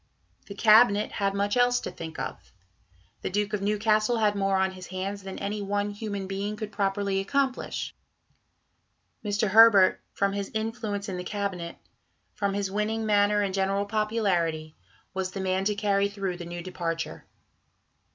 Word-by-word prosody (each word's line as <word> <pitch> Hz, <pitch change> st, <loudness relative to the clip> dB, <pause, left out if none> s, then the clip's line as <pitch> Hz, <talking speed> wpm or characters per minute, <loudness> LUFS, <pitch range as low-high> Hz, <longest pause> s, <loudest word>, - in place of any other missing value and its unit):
The 200 Hz, -, -8 dB
Cabinet 215 Hz, 0 st, +5 dB
had 200 Hz, -1 st, -1 dB
much 200 Hz, +1 st, 0 dB
else 245 Hz, 0 st, +4 dB
to -, -, -5 dB
think 160 Hz, -1 st, -8 dB
of. -, -, -6 dB, 0.7 s
The -, -, -2 dB
Duke 205 Hz, +2 st, -1 dB
of 210 Hz, -, -1 dB
Newcastle 215 Hz, +3 st, +2 dB
had 210 Hz, -2 st, +3 dB
more 195 Hz, -1 st, +1 dB
on 190 Hz, 0 st, +2 dB
his 185 Hz, -1 st, -10 dB
hands 195 Hz, +2 st, -4 dB
than 190 Hz, 0 st, -7 dB
any 205 Hz, +1 st, -3 dB
one 205 Hz, +1 st, -1 dB
human 205 Hz, -2 st, -4 dB
being 200 Hz, +2 st, -3 dB
could 210 Hz, 0 st, -6 dB
properly 200 Hz, -1 st, 0 dB
accomplish. 265 Hz, +6 st, -1 dB, 1.3 s
Mr. 210 Hz, 0 st, 0 dB
Herbert, 210 Hz, -2 st, +7 dB
from 200 Hz, 0 st, +1 dB
his 200 Hz, -1 st, -3 dB
influence 220 Hz, -2 st, -3 dB
in 190 Hz, -2 st, -4 dB
the 180 Hz, -, -4 dB
Cabinet, 185 Hz, -3 st, -3 dB, 0.6 s
from 200 Hz, -1 st, -1 dB
his 200 Hz, -1 st, -2 dB
winning 215 Hz, +2 st, -1 dB
manner 205 Hz, 0 st, +3 dB
and 195 Hz, -1 st, -2 dB
general 195 Hz, +1 st, +1 dB
popularity, 195 Hz, -8 st, 0 dB, 0.4 s
was 190 Hz, -1 st, -2 dB
the 195 Hz, -, -4 dB
man 190 Hz, 0 st, 0 dB
to 210 Hz, 0 st, +1 dB
carry 200 Hz, -1 st, +1 dB
through 195 Hz, -3 st, -3 dB
the 175 Hz, -, -7 dB
new 175 Hz, 0 st, -6 dB
departure. 165 Hz, -2 st, -4 dB
200 Hz, 160 wpm, -27 LUFS, 190-210 Hz, 1.3 s, Herbert